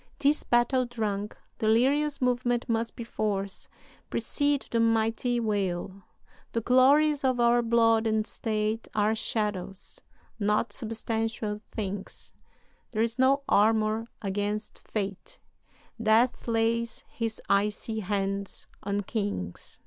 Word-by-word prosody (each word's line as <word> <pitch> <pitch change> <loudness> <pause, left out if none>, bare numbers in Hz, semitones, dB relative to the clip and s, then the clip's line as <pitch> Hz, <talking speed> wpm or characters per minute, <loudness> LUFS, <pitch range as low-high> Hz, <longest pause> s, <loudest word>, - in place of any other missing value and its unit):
"This 295 +1 +2
battle 245 +1 +2
drunk, 210 -3 -3 0.2
delirious 275 +7 +2
movement 245 -1 +1
must 230 0 -1
perforce 205 -4 -3 0.4
precede 285 -1 0
the 230 - +2
mighty 230 +2 +2
wail 195 -3 -2 0.5
"'The 230 - 0
glories 280 +5 +4
of 255 -2 +2
our 240 0 +4
blood 230 -1 +3
and 215 -1 +1
state 215 0 -2
Are 210 +1 +3
shadows, 210 -4 -3 0.4
not 210 +2 +1
substantial 225 -2 -2
things; 200 -2 -5 0.6
There 220 -2 0
is 230 +2 -2
no 275 +2 +4
armor 220 +1 +3 0.2
against 205 +2 -2
fate; 205 - -5 0.6
Death 230 +4 +3
lays 230 0 0
his 225 -2 -4
icy 210 +2 +1
hands 195 -1 -2 0.2
on 200 +1 -1
kings.'" 200 - -4
225 Hz, 110 wpm, -28 LUFS, 210-240 Hz, 0.6 s, glories